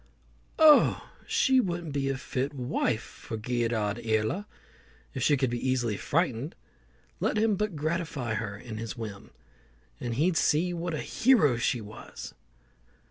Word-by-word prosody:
"Oh! 310 -2 +6 0.2
she 265 -1 +4
wouldn't 175 - -2
be 135 -1 0
a 135 - -1
fit 135 +2 -3
wife 120 -3 -1
for 110 - -8
Gearoidh 115 -1 -1
Iarla 110 - 0 0.7
if - - -4
she 145 - +4
could 130 -2 0
be 120 +2 -1
easily 120 -4 +1
frightened. 140 - -1 0.6
Let - - 0
him 215 -1 +3
but 210 -2 -2
gratify 155 -6 -2
her 105 -2 -3
in 110 0 -8
this 115 +2 -5
whim, 105 -3 -7 0.7
and 120 -1 -3
he'd 165 +6 +2
see 170 +4 +2
what 170 -1 -3
a - - -3
hero 225 - +4
she 115 +1 0
was!" 105 0 -9
130 Hz, 145 wpm, -28 LUFS, 115-170 Hz, 0.7 s, Oh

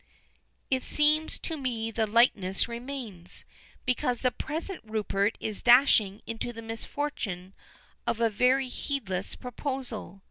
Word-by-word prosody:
"It 260 -1 +3
seems 305 +3 +3
to 325 - -4
me 235 -5 -2
the 220 -1 0
likeness 205 -4 +3
remains, 235 -7 -7 0.4
because 250 -1 +1
the 255 - +3
present 330 +8 -4
Rupert 215 -1 0
is 215 -2 -4
dashing 240 -5 +5
into 230 +1 -4
the 230 -1 -9
misfortune 225 -5 -4 0.5
of 230 - 0
a 230 - +4
very 255 +5 +3
heedless 205 -8 -3
proposal. 250 - -4
235 Hz, 120 wpm, -29 LUFS, 210-265 Hz, 0.5 s, dashing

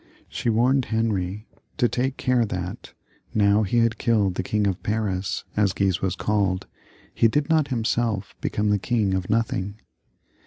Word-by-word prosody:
She - - -2
warned 125 +4 +3
Henry 105 -3 -1 0.3
to 120 - +3
take 130 +3 -1
care 125 -3 +2
that 90 -3 -5 0.4
now 105 0 +4
he 110 +3 0
had 115 -1 +2
killed 105 -6 +2
the - - -2
King 105 +2 0
of 95 -1 -1
Paris, 105 -2 -2
as 100 -3 +2
Guise 95 -2 0
was 95 -2 0
called, 100 -3 0 0.5
he 115 - +4
did 145 +7 0
not 155 -3 +3
himself 115 -5 -1
become 105 0 0
the 105 - +2
king 110 -3 0
of 95 -1 -2
nothing. 105 -3 0
105 Hz, 160 wpm, -24 LUFS, 95-115 Hz, 0.5 s, now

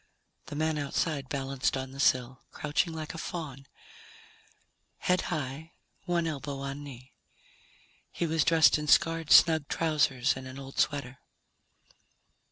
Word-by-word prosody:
The - - -7
man 155 0 0
outside 140 -1 -2
balanced 135 -1 -1
on 130 0 -5
the 135 - -11
sill, 130 -1 +1
crouching 150 +3 -1
like 160 0 -6
a 165 - -7
faun, 140 -7 -6 1.3
head 180 0 +1
high, 155 0 -4 0.3
one 175 -2 0
elbow 145 -3 -4
on 140 +1 -5
knee. 130 -2 -11 1.0
He 170 - -2
was 160 -2 +1
dressed 160 -2 +5
in 150 - -5
scarred, 165 +1 +3
snug 160 -3 +6
trousers 145 -6 +1
and 130 0 -8
an 130 +1 -9
old 135 0 -8
sweater. 140 -3 -1
145 Hz, 135 wpm, -29 LUFS, 135-160 Hz, 1.3 s, snug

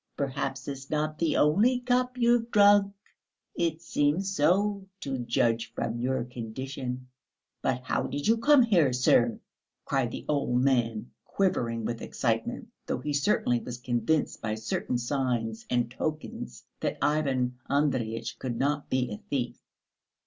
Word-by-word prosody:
Perhaps 135 -1 -3
it's 135 -1 -6
not 155 0 -1
the 165 -3 +1
only 210 - +4
cup 250 0 0
you've 235 -1 +3
drunk. 205 -2 +6 0.6
It 165 -1 -1
seems 175 +8 0
so, 195 +5 +2
to 135 -2 -3
judge 115 -1 +1
from 115 +1 -2
your 130 0 0
condition. 125 +2 -6 0.5
But 125 - -1
how - - -1
did 145 +1 -3
you 225 +1 +4
come 285 +2 +6
here, 170 - +3
sir?" 120 -2 +3 0.5
cried 135 -3 0
the - - -7
old 135 -4 +1
gentleman, 120 -4 +1
quivering 115 - 0
with 115 0 -3
excitement, - - -2 0.2
though - - -1
he 150 0 -3
certainly 140 - +2
was 120 +1 -7
convinced 125 +6 0
by 110 -1 -2
certain 110 +3 -2
signs 120 -3 -2
and 120 -1 +1
tokens 150 - -5
that - - -2
Ivan 130 -5 0
Andreyitch 120 -5 0
could 120 -3 -3
not 145 +2 0
be 130 -2 0
a 105 - -4
thief. 125 -4 -2
135 Hz, 140 wpm, -28 LUFS, 120-160 Hz, 0.6 s, drunk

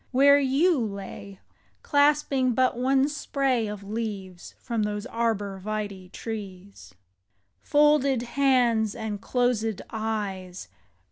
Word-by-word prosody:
where 280 +2 +6
you 285 +4 +2
lay, 200 -2 -6 0.4
Clasping 285 -4 +2
but 255 0 +2
one 265 +2 +2
spray 275 -5 -1
of 205 -1 -6
leaves 200 -4 -6
From 230 -3 -3
those 210 0 -2
arbor 205 -4 -2
vitse 205 -3 -5
trees. 200 - -8 0.7
Folded 290 - +3
hands 245 -5 +2
and 220 -3 -5
closed 230 -5 0
eyes. 200 - -4
225 Hz, 105 wpm, -26 LUFS, 205-265 Hz, 0.7 s, where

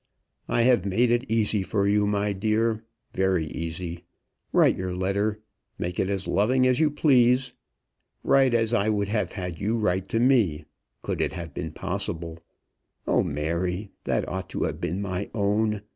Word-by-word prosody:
"I 120 - +2
have 120 -6 +4
made 115 +5 +2
it 120 +2 0
easy 110 -2 +2
for 100 +1 0
you, 105 0 +3
my 105 0 0
dear; 110 +2 0 0.3
very 95 -3 +1
easy. 85 +2 -5 0.5
Write - - +4
your 95 -1 -4
letter. 100 +3 -1 0.3
Make 90 +1 -4
it 95 - +1
as 100 -1 -2
loving 130 +6 +2
as 130 +1 +3
you 155 -1 +4
please. 125 -4 +3 0.7
Write 135 -3 +4
as 115 0 +1
I 105 0 +2
would 100 -2 0
have 105 0 -1
had 90 -5 -5
you 110 +3 0
write 95 -3 0
to 115 - 0
me, 115 - +3 0.4
could - - -2
it - - -1
have 85 -2 -7
been 80 - -5
possible. 85 -3 -4 0.7
O, - - +3
Mary! 85 +6 -2
that - - 0
ought 95 0 -4
to - - -2
have - - -3
been 95 +5 -2
my 95 0 -3
own! 105 0 +1
100 Hz, 170 wpm, -26 LUFS, 90-115 Hz, 0.7 s, have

